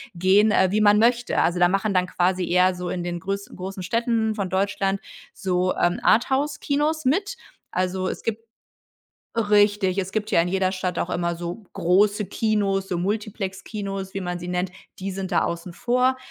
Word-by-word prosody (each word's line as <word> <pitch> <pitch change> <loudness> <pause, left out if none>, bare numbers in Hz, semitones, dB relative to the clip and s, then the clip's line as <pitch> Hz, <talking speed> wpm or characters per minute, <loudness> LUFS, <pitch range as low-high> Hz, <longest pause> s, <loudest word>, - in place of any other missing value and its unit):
gehen, 195 +5 +4
äh, 190 - +4
wie 215 +2 +2
man 210 0 +5
möchte. 240 +2 +2
Also 175 +2 +1
da 175 0 +5
machen 195 +2 0
dann 180 -1 +2
quasi 180 0 0
eher 180 +1 +3
so 180 0 -5
in 175 - -3
den 175 -1 -4
größ 195 +2 -4
großen 190 +1 -6
Städten 230 +1 0
von 200 -3 -2
Deutschland 195 0 0 0.3
so, 185 -1 0
ähm, 175 0 +1
Arthouse-Kinos 290 +4 +1
mit. 390 +10 +1 0.3
Also 185 0 -1
es - - -5
gibt 225 0 -3 1.0
richtig, 205 -3 +3
es 190 0 -2
gibt 215 0 -2
ja 190 - +4
in 170 - 0
jeder 190 0 +1
Stadt 185 -2 -3
auch - - -2
immer 170 -1 -1
so 175 +5 -6
große 205 +4 +2
Kinos, 200 -2 0
so 180 - -1
Multiplex-Kinos, 195 0 -4
wie 195 - -3
man 180 -1 -3
sie 175 0 -7
nennt, 180 +1 -1 0.3
die 195 +1 -4
sind 190 0 -5
da 175 - +2
außen 170 +1 -4
vor. 250 +4 +1
195 Hz, 180 wpm, -24 LUFS, 180-215 Hz, 1.0 s, man